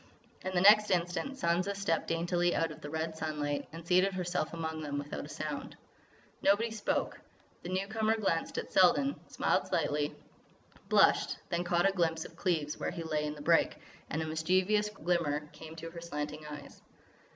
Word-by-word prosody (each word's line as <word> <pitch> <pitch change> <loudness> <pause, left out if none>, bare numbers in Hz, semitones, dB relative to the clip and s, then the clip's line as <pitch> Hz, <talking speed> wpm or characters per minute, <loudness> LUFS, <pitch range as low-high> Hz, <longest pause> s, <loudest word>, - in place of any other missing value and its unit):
And 185 0 -4
the 175 - +3
next 210 +2 +7
instant 180 +9 0
Sansa 185 -4 0
stepped 195 -5 0
daintily 175 +1 +1
out 165 - +1
of - - -11
the 145 - -6
red 160 +1 -3
sunlight 150 -2 -2
and 165 +1 -9
seated 185 +3 +3
herself 180 -3 -2
among 160 -1 -4
them 145 -2 -3
without 145 0 -5
a - - -11
sound. - - -5 0.6
Nobody 215 +4 +3
spoke. 215 -2 -1 0.4
The 175 - -7
newcomer 215 +4 0
glanced 170 -6 -1
at - - -4
Selden, 275 +10 +5
smiled - - 0
slightly, 145 0 0 0.7
blushed, - - +4
then 170 +1 0
caught 175 +1 +3
a - - +3
glimpse 165 -3 0
of - - -11
Cleves 160 -6 -1
where - - -1
he 170 - -5
lay 155 -2 -1
in 150 0 -3
the 150 - -9
brake, 165 +1 +4 0.3
and 160 +2 -1
a - - -4
mischievous 185 +7 +2
glimmer 170 -6 0
came 160 0 -10
into 165 0 -8
her 170 0 -8
slanting 150 -2 -5
eyes. 150 -1 -9
170 Hz, 175 wpm, -32 LUFS, 155-185 Hz, 0.7 s, next